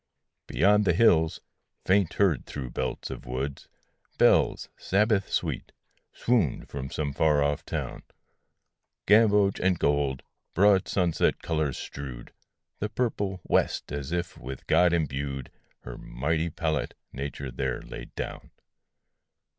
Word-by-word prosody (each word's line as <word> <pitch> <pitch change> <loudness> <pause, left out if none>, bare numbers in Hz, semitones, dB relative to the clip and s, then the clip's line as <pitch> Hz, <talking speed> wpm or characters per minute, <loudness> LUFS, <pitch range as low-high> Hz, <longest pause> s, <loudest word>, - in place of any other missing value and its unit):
Beyond 105 +1 +3
the 85 - +4
hills, 80 -7 +4 0.4
faint 95 -2 +3
heard 95 -7 +2
through 65 -4 -6
belts - - -3
of - - -8
wood, 65 +3 -4 0.5
Bells, - - +4
Sabbath 105 0 +1
sweet, - - -2 0.4
swooned 110 - 0
from 65 -1 -6
some 70 -1 -3
far 75 -1 +3
off 75 0 0
town: - - -4 1.0
Gamboge 105 -2 +5
and 95 -1 +2
gold, 70 -3 +1 0.3
broad 100 0 +5
sunset 90 -4 +1
colors 75 -5 -1
strewed 65 -4 -8 0.5
The 105 - -2
purple 100 -6 -2
west - - 0
as 70 +1 -4
if, 85 0 -3
with 65 +1 -8
God 90 -1 +4
imbued, 70 -5 -2 0.3
Her - - -8
mighty 80 +7 -1
pallet 80 -1 -2 0.2
Nature 70 -1 -5
there 65 0 -3
laid - - -9
down. - - -6
80 Hz, 125 wpm, -27 LUFS, 70-95 Hz, 1.0 s, Gamboge